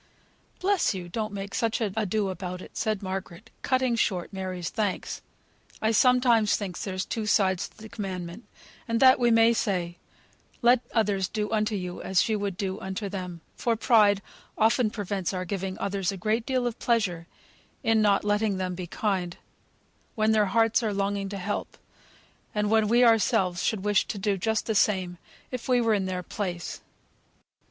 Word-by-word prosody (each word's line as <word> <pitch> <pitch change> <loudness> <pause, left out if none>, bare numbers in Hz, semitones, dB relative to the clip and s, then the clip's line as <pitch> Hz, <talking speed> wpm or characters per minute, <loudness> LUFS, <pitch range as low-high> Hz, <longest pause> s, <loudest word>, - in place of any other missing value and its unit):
"Bless 385 - +2
you! 180 -2 -6
don't 215 +4 -3
make 200 0 -6
such 225 -1 0
ado 210 -1 -1
about 180 0 -5
it," - - -12
said 215 -2 -1
Margaret, 185 -2 -6
cutting 255 -2 +1
short 190 -5 -1
Mary's 185 -3 -4
thanks. 210 -4 -2 0.6
"I 220 - +1
sometimes 240 -2 +4
think 190 -4 -4
there's 185 -1 -3
two 220 -2 -3
sides 190 -3 +2
to - - -28
the 220 - -10
commandment; 190 -2 -6 0.4
and 230 0 0
that 260 0 +7
we 240 -1 +3
may 225 0 +5
say, 180 -6 -2 0.6
'Let 245 +1 +6
others 205 -4 +1
do 210 +1 -3
unto 215 0 +1
you, 180 -2 -5
as 190 +3 +2
you 215 -2 0
would 200 -3 -3
do 195 -1 -3
unto 190 +2 -4
them,' 180 -3 -6
for 235 -1 0
pride 210 -4 +4 0.3
often 225 +1 +3
prevents 200 -3 -3
our 185 0 -3
giving 190 0 -3
others 195 -1 -1
a 195 - -6
great 220 +5 -1
deal 255 -2 0
of 240 -1 -3
pleasure, 190 -8 0 0.6
in 225 -1 +3
not 205 -2 +3
letting 205 -1 +1
them 185 -1 -2
be 180 0 -6
kind, 185 -2 -2 0.8
when 215 0 +2
their 215 -2 +3
hearts 225 +3 +3
are 215 -3 -1
longing 200 0 -1
to 200 - -5
help; 200 +2 -4 0.8
and 210 0 0
when 220 -1 +4
we 240 +3 +4
ourselves 190 -6 +3
should 215 -4 0
wish 205 -1 +2
to - - -4
do 200 0 0
just 220 +3 -1
the 220 - 0
same, 185 -4 +1 0.3
if 255 0 -5
we 250 -1 +4
were 230 -2 +2
in 195 -2 0
their 180 -1 -3
place. 180 -4 -4
205 Hz, 175 wpm, -27 LUFS, 185-225 Hz, 0.8 s, that